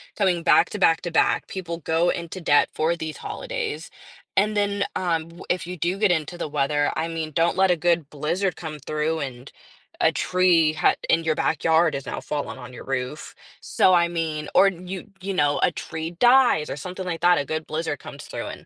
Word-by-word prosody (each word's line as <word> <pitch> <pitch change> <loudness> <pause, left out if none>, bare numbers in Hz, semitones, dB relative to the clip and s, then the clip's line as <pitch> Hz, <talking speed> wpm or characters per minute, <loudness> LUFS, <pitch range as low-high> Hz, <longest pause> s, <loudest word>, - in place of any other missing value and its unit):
coming 185 -4 +1
back 170 0 +5
to 210 - -5
back 165 -3 +4
to 175 - -5
back. - - +2
People 170 -3 -5
go 165 +2 +1
into 170 +2 -4
debt 145 -3 +4
for 160 +2 +1
these 160 -2 -6
holidays, 475 -3 -5 0.5
and 210 +2 +3
then, 205 -1 +1
um, 165 -3 -1
w 170 +2 -12
if 180 -2 0
you 180 +1 -6
do 175 +4 -1
get 205 -3 +3
into 170 +1 -1
the 160 - -3
weather, 145 0 +1
I 165 - -1
mean, 165 -1 -4
don't 165 +4 +2
let 190 -1 +4
a - - +4
good 170 -2 +1
blizzard 170 +6 -1
come 155 -3 -6
through 155 +3 -2
and 130 -2 -7 0.5
a - - +5
tree 175 -4 +3
h - - +5 0.2
in 165 - +3
your 160 -1 +1
backyard 160 0 +2
is 140 - -5
now - - -4
fallen 145 -3 -4
on 125 -1 -10
your - - -9
roof. 135 +2 -4 0.3
So, 185 - +3
I 170 -1 +4
mean 160 -3 -3
or 195 - +7
you 185 +1 -8
you 195 +1 -3
know, 145 -5 +2
a - - +4
tree 160 0 -5
dies 245 -10 +5
or - - -3
something 180 +6 -6
like 165 -3 -4
that. 175 -1 +5
A 145 - -1
good 155 +2 -4
blizzard 155 -3 -3
comes - - -10
through - - -6
and, - - -9
165 Hz, 210 wpm, -24 LUFS, 155-180 Hz, 0.5 s, or